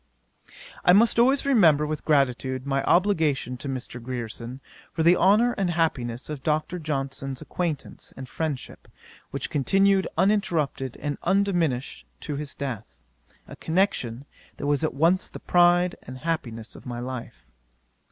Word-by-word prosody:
'I 180 - +6
must 230 +4 +5
always 265 +4 +4
remember 170 - +5
with 155 0 -4
gratitude 130 -3 +1
my 135 -1 0
obligation 160 -9 +2
to 140 - -6
Mr. 125 -2 -5
Grierson, 120 0 -5 0.3
for 160 - -1
the 170 +2 +6
honour 210 +7 +4
and 190 -2 +1
happiness 130 -8 -1
of 150 -3 -6
Dr. 155 +5 -1
Johnson's 135 -3 -3
acquaintance 165 -6 -4
and 130 - -7
friendship, 150 -2 -5 0.4
which - - -4
continued 195 +6 +3
uninterrupted 170 - 0
and 145 -1 -3
undiminished 175 -9 0
to 150 - -4
his 145 -1 -5
death: 120 - -6 0.4
a - - -10
connection, 150 - -1 0.3
that - - -5
was 145 +1 +1
at 155 - -1
once 170 +6 +2
the - - -9
pride 175 0 +3
and 130 - -9
happiness 125 -7 -4
of - - -12
my 120 -1 -4
life. 125 -1 -7
150 Hz, 140 wpm, -25 LUFS, 130-175 Hz, 0.4 s, I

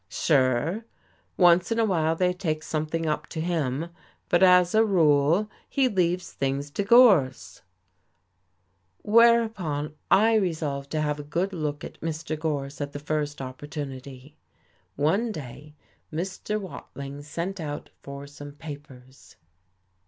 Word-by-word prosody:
"Sure. 145 - +1 0.5
Once 175 +1 +5
in 230 - +1
a 225 - +3
while 165 -5 +1
they 180 +1 +1
take 155 -4 -3
something 155 +1 -2
up 150 -1 -2
to 160 - -6
him, 160 -2 -1 0.4
but 175 - +3
as 180 -1 +6
a 220 +1 +5
rule 165 -1 +3 0.2
he 270 -2 +2
leaves 180 -4 0
things 140 +1 -2
to 200 - -2
Gorse." 180 - +4 1.4
Whereupon 215 -10 +3 0.2
I 220 +3 +5
resolved 155 -8 -2
to 155 - 0
have 150 -1 -1
a - - -5
good 175 +7 -2
look 150 -4 -3
at - - -9
Mr. 160 0 -3
Gorse 145 -3 -3
at 145 0 -4
the - - -4
first 150 -1 -3
opportunity. 135 0 -8 0.6
One 195 +11 +1
day 150 - -9 0.4
Mr. 190 +6 -3
Watling 140 -7 -8
sent 170 +6 -5
out 145 -2 -6
for 140 0 -8
some 145 0 -11
papers. 140 -4 -12
155 Hz, 130 wpm, -26 LUFS, 145-180 Hz, 1.4 s, as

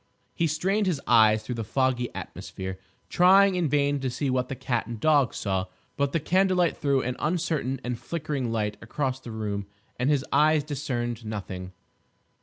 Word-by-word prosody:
He 165 - +1
strained 190 +7 0
his 170 -6 0
eyes 110 -2 +5
through 125 - -4
the 115 -1 -3
foggy 125 +2 0
atmosphere, 95 0 -6 0.3
trying 195 +2 +5
in 175 -4 0
vain 145 0 +2
to 130 -1 -2
see 135 +2 -2
what 125 0 0
the 135 - -3
cat 120 -4 -2
and 115 -2 -6
dog 145 -2 +3
saw; 95 -2 -1 0.3
but 140 -1 0
the 165 - +1
candlelight 180 +1 +2
threw 140 -3 +1
an 125 +1 -2
uncertain 155 -5 -1
and 125 -1 -3
flickering 140 -2 -3
light 105 -2 -1
across 130 +3 -2
the 125 - -10
room 105 -3 -3 0.3
and 125 +3 +1
his 145 -2 +2
eyes 150 +1 +4
discerned 120 -5 -3
nothing. 95 -4 -6
130 Hz, 175 wpm, -26 LUFS, 115-155 Hz, 0.3 s, eyes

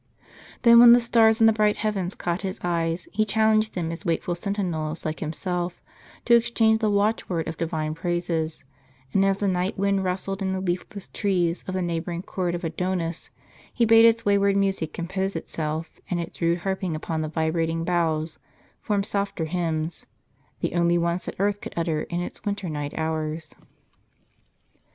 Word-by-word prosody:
Then 235 -1 +8
when 235 0 +10
the 240 - +7
stars 230 -1 +4
in - - +7
the 225 - +6
bright 210 -1 +2
heavens 200 -4 -2
caught 175 +1 -2
his 190 -2 -4
eyes, 170 0 -1
he 215 - +2
challenged 220 0 +2
them 165 -3 -2
as 165 - -7
wakeful 175 -1 -1
sentinels 170 -4 -3
like 155 0 -3
himself, 175 +2 -3 0.5
to 240 - +4
exchange 225 -1 +3
the 220 -2 +1
watchword 200 -5 0
of 165 - -4
Divine 155 -1 -2
praises; 170 -1 -2 0.5
and 195 - +4
as 195 0 +2
the 200 - 0
night 185 +1 0
wind 195 0 +1
rustled 190 +2 -2
in 190 -1 0
the 190 - -2
leafless 185 +2 -4
trees 180 -4 0
of 185 - -3
the 185 - 0
neighboring 170 +1 -3
court 180 -3 -2
of 175 - -6
Adonis, 170 0 -2 0.4
he 235 - +2
bade 225 0 +7
its 230 0 +4
wayward 200 -1 +3
music 195 -5 0
compose 190 +3 -3
itself, 160 0 -4
and 180 - -1
its 170 +1 -7
rude 170 +1 +1
harping 190 -3 -1
upon 160 +1 -3
the 155 - -2
vibrating 165 +1 0
boughs 165 -2 0 0.4
form 205 -2 0
softer 200 -5 -2
hymns, 160 -1 -2 0.2
— - - -39
the - - -1
only 170 0 +3
ones 170 +1 -1
that - - -5
earth 205 +1 0
could - - -8
utter 165 -2 0
in 175 0 -3
its 175 - -6
winter 205 -3 -3
night 145 -1 -4
hours. 160 0 -3
180 Hz, 175 wpm, -25 LUFS, 165-200 Hz, 0.5 s, when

